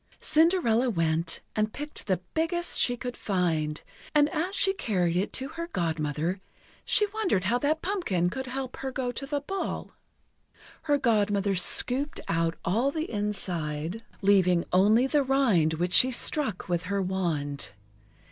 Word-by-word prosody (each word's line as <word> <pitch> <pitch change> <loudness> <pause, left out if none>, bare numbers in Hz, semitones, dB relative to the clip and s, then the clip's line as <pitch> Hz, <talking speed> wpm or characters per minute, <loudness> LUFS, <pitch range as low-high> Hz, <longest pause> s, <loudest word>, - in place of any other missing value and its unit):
Cinderella 305 -8 +3
went, 165 -4 0
and 215 0 0
picked 295 -3 -4
the 185 -2 0
biggest 345 +2 +1
she 245 -1 +2
could 245 0 -5
find; 165 -6 -1 0.3
and 295 0 +5
as 360 +4 -2
she 385 -1 +4
carried 180 - -1
it 185 +3 0
to 265 +1 -2
her 335 +1 -6
Godmother, 165 - -2 0.4
she 420 - +3
wondered 390 - 0
how 235 +6 +1
that 305 +4 0
pumpkin 200 - 0
could 265 +4 -5
help 260 0 -5
her 265 -1 -4
go 255 -1 -2
to 275 +3 -6
the 290 0 -2
ball. 385 +6 -4 0.9
Her 290 -2 +1
Godmother 205 -5 +1
scooped 260 - +2
out 165 0 0
all 230 +10 +1
the 315 +2 -4
inside, 180 -4 -3 0.2
leaving 185 -3 +3
only 210 +7 +4
the 290 +2 +2
rind 240 - +2
which 175 +3 -2
she 255 - +7
struck 255 -5 0
with 175 -1 -1
her 200 +2 -1
wand. 160 - -2
215 Hz, 150 wpm, -27 LUFS, 175-280 Hz, 0.9 s, she